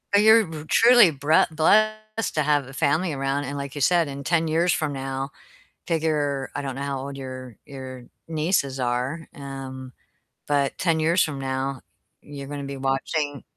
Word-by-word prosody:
You're 220 +2 +6
b 160 -3 -8
truly 235 -2 +7
bre 145 +2 +3
blessed 215 +7 +1
to 155 - +2
have 145 -2 +1
a 135 - -11
family 155 +4 +1
around, 135 +1 -1
and 140 +2 -5
like 140 -1 -5
you 145 - -4
said, 170 +2 +3
in 140 0 -6
10 165 +2 +1
years 165 +3 +2
from 155 -3 -1
now, 135 0 -4 0.6
figure 150 -4 0
I 145 - -3
don't 135 -2 -4
know 135 - -5
how 140 -1 -2
old 135 +1 -6
your 130 -3 -8
your 130 -3 -9 0.2
nieces 155 -4 0
are, 125 +6 -2
um, 135 -2 -8 0.6
but 140 -2 +1
10 165 -3 +1
years 165 +3 +3
from 145 -3 -4
now 135 0 -3 0.4
you're 140 -1 -9
gonna 145 0 -5
be 140 0 -6
watching 140 +2 -2
140 Hz, 170 wpm, -24 LUFS, 135-160 Hz, 0.6 s, truly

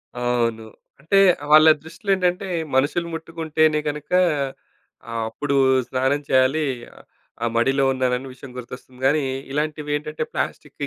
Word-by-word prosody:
అవును. 120 -2 0 0.4
అంటే 160 +8 +1 0.3
వాళ్ళ 155 +1 +8 0.2
దృష్టిలో 165 +5 -10
ఏంటంటే, 180 +1 0 0.3
మనుషులు 150 +6 +1
ముట్టుకుంటేనే 160 -1 0
కనుక 150 0 -7 1.0
ఆహ్, 115 -1 -2
అప్పుడు 140 +5 -2 0.3
స్నానం 130 +3 0
చేయాలి. 130 +4 +3 0.8
ఆ - - +2
మడిలో 135 +4 +2
ఉన్నానని 130 0 -1
విషయం 130 0 -12
గుర్తొస్తుంది 125 +1 -10
కానీ. 150 +2 +2 0.3
ఇలాంటివి 150 +1 -2
ఏంటంటే 150 +1 -4
ప్లాస్టిక్‌కి 145 -1 -4
145 Hz, 115 wpm, -22 LUFS, 130-155 Hz, 1.0 s, వాళ్ళ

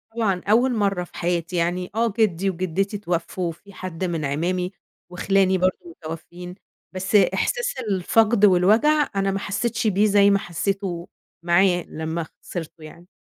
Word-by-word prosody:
طبعًا 195 -6 0
أوّل 245 +4 +4
مرّة 195 -4 0
في - - -13
حياتي، 175 0 -2
يعني 175 +1 -1
آه 230 -1 +1
جدي 195 -3 +2
وجدتي 185 +3 -2
اتوفّوا، 175 -2 -2
في 200 +5 -16
حد 185 -1 -6
من 170 -4 -2
أعمامي، 180 +6 -1 0.4
وخِلاني 190 +1 +2
برضه 185 0 +1 0.2
متوفّيين، 175 +3 -8 0.4
بس 190 +3 -2
إحساس 485 - +2 0.2
الفقد 210 +3 +3
والوجع 220 +11 +4
أنا 195 0 +1
ما 195 - -2
حسّيتش 225 +3 -2
بيه 205 +1 +3
زي 200 -1 +5
ما 200 0 +3
حسّيته 175 -1 -3 0.4
معاه 175 0 +3
لما 160 +1 -4 0.2
خسرته 165 -2 -7
يعني. 170 +3 -13
185 Hz, 145 wpm, -23 LUFS, 175-200 Hz, 0.4 s, زي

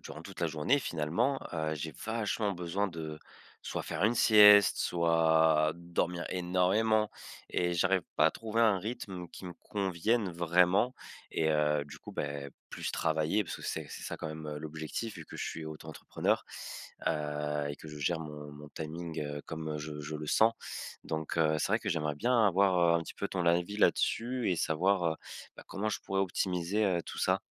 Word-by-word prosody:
durant - - -8
toute - - -10
la 85 - +3
journée, 80 - +2
finalement, 110 - 0
heu, 80 0 -1
j'ai 80 +2 -5
vachement 110 -2 -1
besoin 95 +3 -1
de 80 -3 -6 0.4
soit - - -3
faire 95 - -2
une 115 +2 +3
sieste, 105 -2 +8
soit 80 -2 +3
dormir 85 0 -2
énormément 95 +5 +2 0.4
et 90 0 0
j'arrive 95 +1 +2
pas - - +6
à - - +4
trouver 115 0 -2
un 110 -4 +5
rythme 95 -3 -5
qui 95 - -10
me 90 - -7
convienne 100 +4 0
vraiment 90 +7 +3 0.4
et 80 - +1
heu, 75 -1 +2
du 75 - -11
coup, - - -11
beh, 70 -1 -4 0.2
plus - - -4
travailler, 80 +6 +1
parce 80 - -5
que - - -12
c'est - - -3
c'est - - -8
ça - - -4
quand - - -4
même, 80 0 -6
heu, 75 0 -4
l'objectif, 80 +8 -5
vu - - -8
que - - -10
je - - -2
suis 80 - -5
auto-entrepreneur, 80 0 -2 0.6
heu 75 -1 -1
et 70 - -6
que 80 - -11
je 75 - -8
gère 80 +3 0
mon 75 -2 -8
mon 75 0 -11
timing, 80 +2 -5
heu, 75 0 -4
comme 80 -1 -4
je 75 0 -6
je 75 +1 -6
le 75 0 -6
sens. 110 +9 +4 0.5
Donc, 80 +1 -3
heu, 80 -1 +3
c'est - - 0
vrai 105 +3 +3
que 105 - -5
j'aimerais 75 -4 -1
bien 120 +4 +3
avoir, 95 -1 +3 0.2
heu, - - +2
un - - -4
petit 80 - -9
peu 100 - -3
ton 90 -2 -2
avis 85 +4 +2
là-dessus 120 +2 +2
et 90 - +1
savoir, 90 +4 +2
heu, - - -7 0.4
bah, - - -10
comment 100 +2 -2
je 105 - -2
pourrais 95 0 -1
optimiser, 95 +1 0
heu, 90 -4 +1
tout - - -8
ça? - - +2
85 Hz, 195 wpm, -31 LUFS, 80-100 Hz, 0.6 s, sieste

